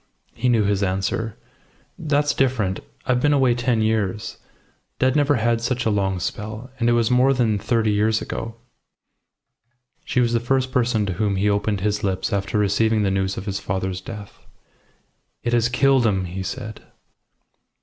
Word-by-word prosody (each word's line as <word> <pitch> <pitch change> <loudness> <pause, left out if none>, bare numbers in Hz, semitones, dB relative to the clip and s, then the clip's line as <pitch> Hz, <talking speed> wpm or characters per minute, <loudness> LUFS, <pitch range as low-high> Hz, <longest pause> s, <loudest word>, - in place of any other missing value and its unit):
He 125 - 0
knew 115 -3 +3
his 100 0 +1
answer. 100 +4 -1 0.6
"That's 145 -1 +1
different. 120 -8 0 0.3
I've 125 -2 +1
been 145 +1 +3
away 130 -3 +4
ten 120 -2 +1
years. 105 -3 -1 0.6
Dad 130 0 +2
never 145 -1 +3
had 115 0 +1
such 125 +1 -1
a 110 - +2
long 95 -2 0
spell; 110 +6 -5
and 120 -1 +2
it - - +4
was 120 0 +2
more 130 +2 +4
than 110 -5 +1
thirty 110 0 +1
years 110 +2 +2
ago." 115 0 -5 1.5
She - - -1
was 120 -1 +2
the 115 - +3
first 130 +2 0
person 120 -5 +1
to 95 - -2
whom 100 +1 0
he 100 +2 +1
opened 100 -1 0
his 105 +1 -1
lips 95 -1 -1
after 100 +1 -1
receiving 105 +2 +2
the 95 - +1
news 95 0 -1
of 95 - -5
his 100 -2 -3
father's 95 -1 -3
death. 105 -3 -9 1.0
"It 120 - -1
has 120 0 +3
killed 130 -1 +3
him!" 95 -3 0
he 90 +2 -5
said. 110 +3 -6
110 Hz, 170 wpm, -22 LUFS, 100-125 Hz, 1.5 s, away